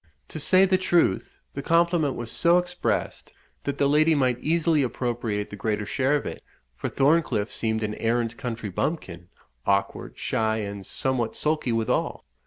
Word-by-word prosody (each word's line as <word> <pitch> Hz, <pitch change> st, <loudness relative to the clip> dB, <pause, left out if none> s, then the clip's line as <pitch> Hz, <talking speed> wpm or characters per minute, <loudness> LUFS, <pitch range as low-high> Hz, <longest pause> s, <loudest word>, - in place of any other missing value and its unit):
To 155 Hz, -, -6 dB
say 185 Hz, +5 st, +5 dB
the 185 Hz, -1 st, +2 dB
truth, 170 Hz, -, +1 dB, 0.2 s
the 140 Hz, -, -4 dB
compliment 165 Hz, -2 st, +2 dB
was 120 Hz, -1 st, -4 dB
so 170 Hz, +1 st, +4 dB
expressed, 180 Hz, 0 st, -2 dB, 0.3 s
that 140 Hz, 0 st, -2 dB
the 140 Hz, -, +3 dB
lady 155 Hz, +3 st, +4 dB
might 130 Hz, -3 st, +1 dB
easily 160 Hz, 0 st, +2 dB
appropriate 120 Hz, -4 st, -2 dB
the -, -, -6 dB
greater 105 Hz, 0 st, -2 dB
share 135 Hz, +6 st, +1 dB
of 145 Hz, -, -2 dB
it, -, -, -6 dB, 0.3 s
for -, -, -4 dB
Thorncliff 140 Hz, -8 st, +2 dB
seemed 110 Hz, +1 st, -1 dB
an 105 Hz, 0 st, -2 dB
arrant 115 Hz, +1 st, -1 dB
country 115 Hz, -4 st, -5 dB
bumpkin, 90 Hz, -, -3 dB, 0.3 s
awkward, 100 Hz, 0 st, -1 dB
shy, 110 Hz, -1 st, 0 dB
and 100 Hz, -2 st, -5 dB
somewhat 120 Hz, -1 st, -1 dB
sulky 150 Hz, -5 st, 0 dB
withal. 115 Hz, -1 st, -1 dB
125 Hz, 160 wpm, -25 LUFS, 110-155 Hz, 0.3 s, say